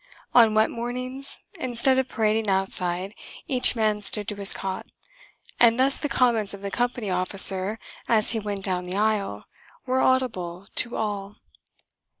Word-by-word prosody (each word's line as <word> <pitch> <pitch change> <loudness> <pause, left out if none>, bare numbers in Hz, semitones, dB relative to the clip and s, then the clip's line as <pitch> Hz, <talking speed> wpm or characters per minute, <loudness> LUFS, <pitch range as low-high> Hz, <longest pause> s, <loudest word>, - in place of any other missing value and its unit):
On 225 -3 +5
wet 220 0 +2
mornings, 255 +3 -5 0.2
instead 255 +1 +2
of 265 - -1
parading 215 -1 0
outside, 190 0 -2 0.3
each 255 -4 +3
man 215 -2 0
stood 205 0 +3
to 210 - -5
his 200 -1 0
cot, 190 -1 -5 0.7
and 230 -1 +5
thus 270 +1 +2
the 295 - -3
comments 225 -7 0
of 195 - -14
the 200 - -5
Company 240 -3 -2
Officer, 190 +2 +4 0.3
as 220 -2 +2
he 225 - -1
went 205 -2 -5
down 180 -1 -3
the 180 - -5
aisle, 205 - -1 0.4
were 260 0 0
audible 195 -9 -1
to 240 -1 +4
all. 205 -2 -4
215 Hz, 150 wpm, -24 LUFS, 195-245 Hz, 0.7 s, On